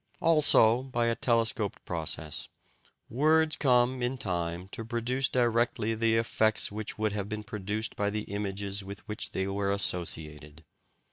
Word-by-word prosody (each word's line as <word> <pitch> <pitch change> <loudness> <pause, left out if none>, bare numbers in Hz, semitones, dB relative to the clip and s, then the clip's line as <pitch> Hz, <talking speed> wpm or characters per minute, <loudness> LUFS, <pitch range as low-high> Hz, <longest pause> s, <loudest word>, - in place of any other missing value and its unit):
Also, 145 -8 +5
by 125 -3 -1
a 115 - +2
telescoped 115 -4 0
process, 80 -3 -3 0.6
words 155 +4 +3
come 125 -2 +2
in 125 +2 -1
time 85 -4 -3
to 115 - -6
produce 120 +3 0
directly 120 -2 +1
the 115 0 +1
effects 110 -2 +2
which 105 +1 -6
would 110 -1 0
have 100 -1 -4
been 105 0 -4
produced 105 +1 -4
by 100 0 0
the 105 +1 -2
images 100 0 -3
with 100 +1 -10
which 105 0 -4
they 95 - -1
were 100 0 -1
associated. 80 -5 -2
110 Hz, 145 wpm, -29 LUFS, 100-120 Hz, 0.6 s, Also